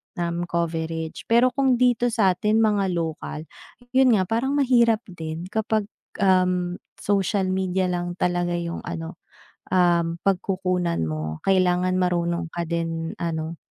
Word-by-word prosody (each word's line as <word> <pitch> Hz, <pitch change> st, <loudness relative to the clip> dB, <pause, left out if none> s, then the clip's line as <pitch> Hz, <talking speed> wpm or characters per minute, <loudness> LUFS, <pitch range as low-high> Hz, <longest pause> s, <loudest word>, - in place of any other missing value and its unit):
na 170 Hz, -1 st, -1 dB, 0.2 s
coverage. 165 Hz, -1 st, -3 dB
Pero 240 Hz, +2 st, +4 dB
kung 265 Hz, -1 st, +2 dB
dito 245 Hz, -1 st, +3 dB
sa'tin 210 Hz, -2 st, +2 dB
mga 205 Hz, -3 st, +2 dB
lokal, 160 Hz, -2 st, -4 dB, 0.5 s
yun 260 Hz, -3 st, +5 dB
nga 190 Hz, -, +2 dB
parang 265 Hz, +5 st, 0 dB
mahirap 235 Hz, -5 st, +3 dB
din 160 Hz, -1 st, -6 dB
kapag, 220 Hz, -1 st, 0 dB, 0.4 s
um, 180 Hz, -1 st, +2 dB, 0.2 s
social 195 Hz, -1 st, +1 dB
media 185 Hz, 0 st, 0 dB
lang 175 Hz, 0 st, -3 dB
talaga 175 Hz, -1 st, 0 dB
yung 170 Hz, 0 st, -3 dB
ano, 165 Hz, 0 st, -6 dB, 0.6 s
um, 170 Hz, -2 st, +3 dB
pagkukunan 185 Hz, -, 0 dB
mo. 80 Hz, 0 st, -4 dB
Kailangan 185 Hz, -1 st, +2 dB
marunong 170 Hz, -1 st, 0 dB
ka 170 Hz, -, -2 dB
din 165 Hz, -1 st, -2 dB
ano, 165 Hz, -1 st, -3 dB
180 Hz, 125 wpm, -24 LUFS, 170-205 Hz, 0.6 s, yun